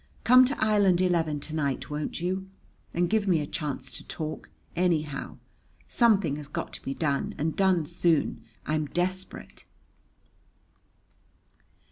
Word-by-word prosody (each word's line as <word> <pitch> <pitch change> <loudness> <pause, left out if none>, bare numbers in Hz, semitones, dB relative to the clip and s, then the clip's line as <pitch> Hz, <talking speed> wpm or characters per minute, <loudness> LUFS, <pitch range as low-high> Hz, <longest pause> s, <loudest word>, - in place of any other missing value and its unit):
Come 255 +2 +8
to 270 +3 -1
Island 205 -4 +4
Eleven 165 -5 +1
to 155 - -6
night, 140 -3 -2
won't 150 0 -3
you? 190 +2 -2 0.4
And 175 +1 +1
give 210 +1 +1
me 175 -4 +4
a 150 - -2
chance 140 -4 -4
to - - -8
talk, 155 -1 -5 0.3
anyhow. 160 -5 -1 0.5
Something 200 - +3
has 150 -1 -8
got 150 - -5
to - - -7
be 135 - -4
done 140 -4 -1
and 155 +2 -1
done 185 -4 +3
soon. 165 -6 +1 0.2
I'm 155 0 0
desperate! 185 +4 -3
170 Hz, 135 wpm, -27 LUFS, 150-190 Hz, 0.5 s, Come